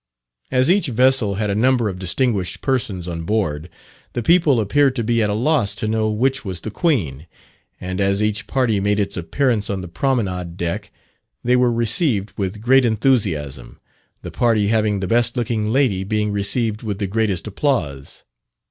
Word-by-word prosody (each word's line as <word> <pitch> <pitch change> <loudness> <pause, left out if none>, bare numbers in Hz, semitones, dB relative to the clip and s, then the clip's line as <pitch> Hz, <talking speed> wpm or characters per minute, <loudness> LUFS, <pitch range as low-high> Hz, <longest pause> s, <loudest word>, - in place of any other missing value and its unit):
As 130 +4 +3
each 195 -2 +2
vessel 125 -4 +2
had 105 0 -1
a - - 0
number 120 +2 +2
of 95 -3 -5
distinguished 95 0 -1
persons 105 -10 -1
on 85 -1 -4
board, 85 -5 -2 0.4
the 120 - -3
people 160 -3 +4
appeared 135 +6 +2
to 120 - -1
be 115 +1 +1
at 105 - +1
a 105 - -1
loss 120 -4 +1
to 105 - -3
know 110 0 0
which 130 +6 0
was 95 -5 -4
the 110 - -6
Queen; 85 - -1 0.5
and 95 +2 -4
as 100 +1 +1
each 105 0 -1
party 125 -6 +1
made 105 +1 0
its 100 - -1
appearance 105 - 0
on 100 -2 -2
the 90 - -7
promenade 90 -5 -2
deck, 85 -2 -3 0.5
they 125 +1 +3
were 125 -1 +3
received 115 - +1
with 100 +1 -4
great 130 +3 +4
enthusiasm, 95 - 0 0.5
the - - -7
party 110 -4 +1
having 105 -3 +1
the 95 - -2
best 120 +3 +2
looking 110 -3 -1
lady 120 -8 +1
being 105 +1 -1
received 105 +2 0
with 105 -4 -4
the 100 - -2
greatest 100 -3 -1
applause. 95 - -2
110 Hz, 175 wpm, -20 LUFS, 95-125 Hz, 0.5 s, people